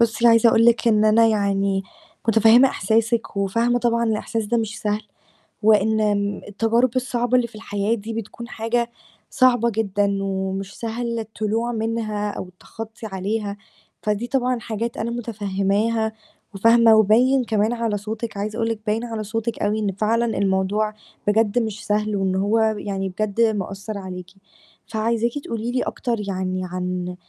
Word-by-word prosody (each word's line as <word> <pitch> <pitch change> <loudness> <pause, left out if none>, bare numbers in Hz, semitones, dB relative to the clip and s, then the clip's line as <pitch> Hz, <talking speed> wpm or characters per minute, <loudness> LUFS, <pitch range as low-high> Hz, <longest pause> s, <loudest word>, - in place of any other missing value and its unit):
بُصّي 235 0 +3
عايزة 230 0 +6
أقول 225 0 +4
لِك 235 0 +4
إن 215 -1 +4
أنا 220 +1 +5
يعني 200 -2 +1 0.5
مُتَفهِّمة 225 +4 +6
إحساسِك، 225 +1 0
وفاهمة 230 +5 +1
طبعًا 235 -1 +1
الإحساس 225 0 -1
ده 235 - +1
مش 225 0 -3
سهل، 210 -1 -1 0.6
وإن 220 0 +4
آمم، 205 -1 0
التجارب 225 +4 +2
الصعبة 250 -1 0
اللي 240 - +1
في 235 - -17
الحياة 205 0 -1
دي 225 +1 -6
بتكون 230 +1 -6
حاجة 235 +1 -1 0.4
صعبة 245 -2 +3
جدًا، 200 -2 0
ومش 195 0 -3
سهل 235 0 -3
الطلوع 220 +2 -2
منها، 220 -2 -2
أو 185 - -6
التخطي 220 +5 -10
عليها. 200 +1 -3 0.5
فدي 210 +3 -1
طبعًا 250 -2 0
حاجات 230 +1 -4
أنا 225 +1 -2
مُتَفهِّماها، 220 0 -1 0.4
وفاهمة، 230 +2 +6
وباين 240 +5 +4
كمان 220 -1 +1
على 230 -3 -1
صوتِك، 220 +1 -5
عايزة 210 +2 -3
أقول 225 -1 0
لِك 225 -2 -2
باين 215 +2 0
على 225 -2 -4
صوتِك 225 +2 -3
أوي 210 +1 +1
إن 205 -2 0
فعلًا 220 +4 +1
الموضوع 200 +2 +1 0.3
بجد 220 +2 +3
مش 215 -2 -4
سهل، 210 0 0
وإن 190 -1 0
هو 220 +3 +2
ب 205 - -6
يعني 195 -1 -3
بجد 215 +3 -2
مأثّر 205 -1 -1
عليكِ. 185 -2 -7 0.6
فعايزاكِ 230 +1 0
تقول 230 -2 -4
لي 245 +2 -1
أكتر 240 -2 -2
يعني 185 -1 -2
عن 180 0 -4
220 Hz, 155 wpm, -22 LUFS, 200-230 Hz, 0.6 s, عايزة